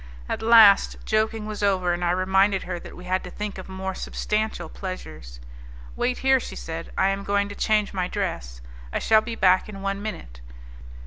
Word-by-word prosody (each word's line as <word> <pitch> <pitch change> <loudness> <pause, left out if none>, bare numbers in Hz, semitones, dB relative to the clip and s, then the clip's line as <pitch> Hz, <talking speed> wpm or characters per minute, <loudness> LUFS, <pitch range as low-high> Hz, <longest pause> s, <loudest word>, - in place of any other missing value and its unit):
At - - -3
last, 220 -3 +6
joking 215 0 0
was 215 -1 -6
over, 185 -3 +2
and 175 0 -3
I 175 - +1
reminded 190 +2 +2
her 180 -1 -5
that - - -11
we 180 - -11
had 185 +1 -1
to 180 - -8
think 210 0 -6
of 185 - -10
more 190 0 -4
substantial 210 -3 -2
pleasures. 75 - -8 0.6
"Wait 250 - 0
here," 265 0 +5
she - - -8
said, 165 0 -6
"I 190 - +3
am 195 0 -2
going 200 0 0
to 205 - -8
change 210 -2 +1
my 185 -2 -1
dress. 165 - -4 0.3
I - - -1
shall 220 -1 +4
be 230 0 -5
back 185 -1 +3
in 195 -2 -8
one 195 0 -2
minute." - - -7
195 Hz, 195 wpm, -24 LUFS, 180-210 Hz, 0.6 s, last